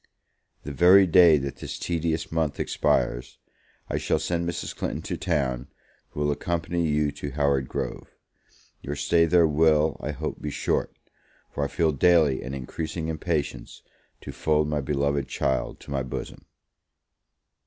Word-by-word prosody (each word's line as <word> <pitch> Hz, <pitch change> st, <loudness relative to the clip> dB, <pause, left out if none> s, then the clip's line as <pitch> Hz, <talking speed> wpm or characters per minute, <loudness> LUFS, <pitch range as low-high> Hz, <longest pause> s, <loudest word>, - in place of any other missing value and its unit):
The 75 Hz, -, -6 dB
very 90 Hz, +7 st, +6 dB
day 85 Hz, -2 st, +6 dB
that 70 Hz, 0 st, -4 dB
this -, -, -6 dB
tedious 80 Hz, -2 st, -2 dB
month 80 Hz, -3 st, -1 dB
expires, -, -, 0 dB, 0.5 s
I -, -, -2 dB
shall -, -, +1 dB
send 85 Hz, -1 st, -1 dB
Mrs. 85 Hz, -, -5 dB
Clinton -, -, -4 dB
to -, -, -3 dB
town, 65 Hz, -7 st, -1 dB, 0.4 s
who 75 Hz, -, -6 dB
will 75 Hz, 0 st, +2 dB
accompany 85 Hz, +3 st, -1 dB
you 75 Hz, -1 st, +1 dB
to 70 Hz, -, -6 dB
Howard 70 Hz, -1 st, 0 dB
Grove. -, -, -4 dB, 0.7 s
Your 70 Hz, -, -5 dB
stay 85 Hz, +4 st, +3 dB
there 85 Hz, 0 st, +5 dB
will, 80 Hz, 0 st, +3 dB
I 75 Hz, -, -5 dB
hope, 75 Hz, +1 st, -5 dB
be 75 Hz, -, -3 dB
short; -, -, -1 dB, 0.6 s
for 70 Hz, -, -2 dB
I -, -, 0 dB
feel 80 Hz, +2 st, +1 dB
daily 75 Hz, -2 st, +3 dB
an 65 Hz, +1 st, -5 dB
increasing 80 Hz, +5 st, -5 dB
impatience 80 Hz, -2 st, -3 dB, 0.4 s
to -, -, -7 dB
fold 75 Hz, -1 st, +1 dB
my 75 Hz, -1 st, -1 dB
beloved 70 Hz, 0 st, -1 dB
child 65 Hz, -1 st, -2 dB
to -, -, -11 dB
my 70 Hz, -1 st, 0 dB
bosom! 65 Hz, -, -7 dB
75 Hz, 155 wpm, -25 LUFS, 70-80 Hz, 0.7 s, very